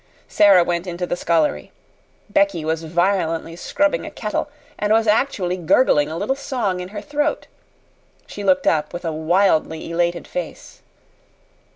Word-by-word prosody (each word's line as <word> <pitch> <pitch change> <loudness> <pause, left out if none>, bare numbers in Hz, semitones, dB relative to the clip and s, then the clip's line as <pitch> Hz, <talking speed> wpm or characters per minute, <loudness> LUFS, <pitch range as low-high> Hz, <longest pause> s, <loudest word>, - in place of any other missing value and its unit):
Sara 195 -4 +5
went 175 +1 -2
into 175 0 -3
the 175 - -2
scullery. 160 - 0 0.6
Becky 200 -5 +1
was 160 0 -1
violently 165 -1 0
scrubbing 295 - 0
a - - -6
kettle, - - -3 0.3
and 210 0 0
was 225 +1 +4
actually 210 -5 +1
gurgling 160 - +3
a 160 - -5
little 210 +9 -1
song 245 -9 -2
in 180 - -5
her 205 +2 -7
throat. 295 +1 -2 0.8
She 205 - -8
looked 275 +4 +2
up 150 -1 +1
with 175 - -6
a 165 - -1
wildly 160 0 +1
elated 170 0 -1
face. - - -7
180 Hz, 150 wpm, -21 LUFS, 165-210 Hz, 0.8 s, Sara